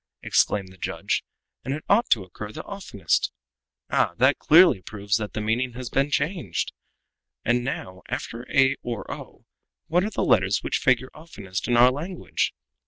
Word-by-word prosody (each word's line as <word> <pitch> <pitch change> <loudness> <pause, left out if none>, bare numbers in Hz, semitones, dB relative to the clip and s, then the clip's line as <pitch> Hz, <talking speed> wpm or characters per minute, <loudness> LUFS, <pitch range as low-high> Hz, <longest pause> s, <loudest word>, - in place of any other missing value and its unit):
exclaimed 100 -2 +2
the 95 0 -17
judge, - - -2 0.4
"and 135 - -2
it 155 - -7
ought 230 +4 +3
to 110 -6 +3
occur 105 +3 -8
the - - -7
oftenest. 195 - -1 0.6
Ah! 85 - +2
that 130 +4 +4
clearly 165 - +6
proves 100 +2 -1
that 105 -2 -5
the 110 - -3
meaning 120 +3 0
had 125 0 -6
been 140 +1 +2
changed. 145 - -1 0.7
And 120 +1 +2
now, 95 -7 -5
after 120 +2 -5
a 135 -1 +4
or 115 -5 -4
o, - - -11 0.4
what 180 +3 +2
are 210 - -1
the - - -1
letters 95 +2 +3
which - - 0
figure 130 0 +2
oftenest 100 - -6
in 120 -1 +3
our 125 +1 +7
language? 165 +7 -2
120 Hz, 170 wpm, -25 LUFS, 105-145 Hz, 0.7 s, our